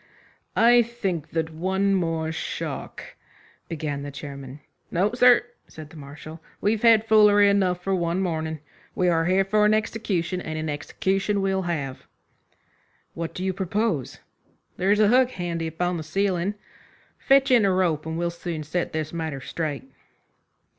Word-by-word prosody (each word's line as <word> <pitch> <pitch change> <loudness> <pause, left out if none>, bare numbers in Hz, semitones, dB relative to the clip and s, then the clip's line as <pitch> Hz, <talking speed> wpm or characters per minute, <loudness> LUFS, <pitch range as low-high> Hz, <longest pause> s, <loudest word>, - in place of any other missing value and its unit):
"I 240 +1 +6
think 195 -10 -3
that 160 0 -2
one 190 +4 0
more 165 -3 -1
shock 160 - -5 0.4
" - - -31
began 150 -3 -3
the 145 - -6
chairman. 140 -1 -8 0.3
"No, 195 +6 +1
sir," 245 -1 +5 0.2
said 155 -1 -11
the - - -14
Marshal 155 +2 -10 0.2
"we've 215 +1 0
had 225 -2 +5
foolery 210 -2 +6
enough 185 -3 +1
for 195 - 0
one 170 -1 0
morning. 160 -4 -2 0.3
We 180 -1 +2
are 165 -1 +2
here 190 +2 +3
for 210 +2 +2
an 210 +1 +4
execution, 195 -5 -2
and 155 -1 -5
a 150 - -1
execution 195 +7 -1
we'll 195 0 0
have." 140 -6 -4 1.1
"What 165 0 -5
do 185 - -4
you 190 0 0
propose?" 190 - -2 0.6
"There's 200 +3 +2
a 210 -1 +5
hook 250 +1 +4
handy 170 -2 -3
upon 175 +2 -2
the - - -4
ceiling. 190 +3 -1 0.6
Fetch 275 0 +4
in 240 -4 +6
a 195 - +3
rope, 170 -5 0
and 160 0 -3
we'll 170 0 -1
soon 170 -2 -5
set 170 +4 -3
this 155 0 -3
matter 160 -4 -3
straight." 145 +1 -4
180 Hz, 160 wpm, -24 LUFS, 160-200 Hz, 1.1 s, I